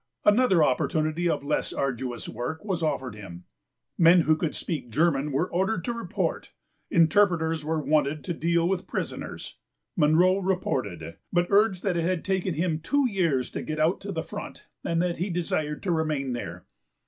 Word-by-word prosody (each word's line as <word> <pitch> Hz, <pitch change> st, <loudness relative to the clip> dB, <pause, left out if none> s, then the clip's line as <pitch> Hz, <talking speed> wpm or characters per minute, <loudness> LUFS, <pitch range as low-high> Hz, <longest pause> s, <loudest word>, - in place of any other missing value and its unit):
Another 205 Hz, -6 st, +5 dB
opportunity 155 Hz, +4 st, +1 dB
of 150 Hz, -3 st, -1 dB
less 140 Hz, -, -1 dB
arduous 125 Hz, -3 st, -3 dB
work 125 Hz, -, -5 dB
was 185 Hz, -5 st, -2 dB
offered 130 Hz, -6 st, -1 dB
him. 95 Hz, -4 st, -10 dB, 0.6 s
Men 170 Hz, +1 st, +7 dB
who 155 Hz, 0 st, +3 dB
could 155 Hz, 0 st, -2 dB
speak 145 Hz, -8 st, -4 dB
German 150 Hz, +2 st, +1 dB
were 140 Hz, +6 st, +1 dB
ordered 190 Hz, 0 st, -1 dB
to 240 Hz, -, -1 dB
report: 230 Hz, -7 st, -3 dB, 0.4 s
interpreters 165 Hz, -2 st, +3 dB
were 160 Hz, +1 st, -1 dB
wanted 150 Hz, 0 st, +1 dB
to 175 Hz, -, -3 dB
deal 170 Hz, +1 st, +1 dB
with 185 Hz, -1 st, -1 dB
prisoners. -, -, -5 dB, 0.4 s
Munro 175 Hz, +3 st, +4 dB
reported, 135 Hz, -, -1 dB
p. -, -, -6 dB, 0.3 s
xxiiibut 175 Hz, 0 st, +4 dB
urged 200 Hz, -2 st, +3 dB
that 185 Hz, -4 st, 0 dB
it 170 Hz, -, 0 dB
had 180 Hz, -1 st, -1 dB
taken 190 Hz, -3 st, 0 dB
him 160 Hz, 0 st, 0 dB
two 280 Hz, -, +1 dB
years 170 Hz, -, 0 dB
to -, -, -4 dB
get 155 Hz, 0 st, -4 dB
out 160 Hz, +4 st, +2 dB
to 200 Hz, -, -5 dB
the 165 Hz, -4 st, -3 dB
front -, -, -8 dB, 0.2 s
and 165 Hz, 0 st, 0 dB
that 175 Hz, -1 st, -1 dB
he 180 Hz, +4 st, -2 dB
desired 155 Hz, -4 st, -2 dB
to 185 Hz, -, 0 dB
remain 155 Hz, -5 st, -1 dB
there. 90 Hz, -7 st, -6 dB
165 Hz, 175 wpm, -26 LUFS, 150-180 Hz, 0.6 s, Men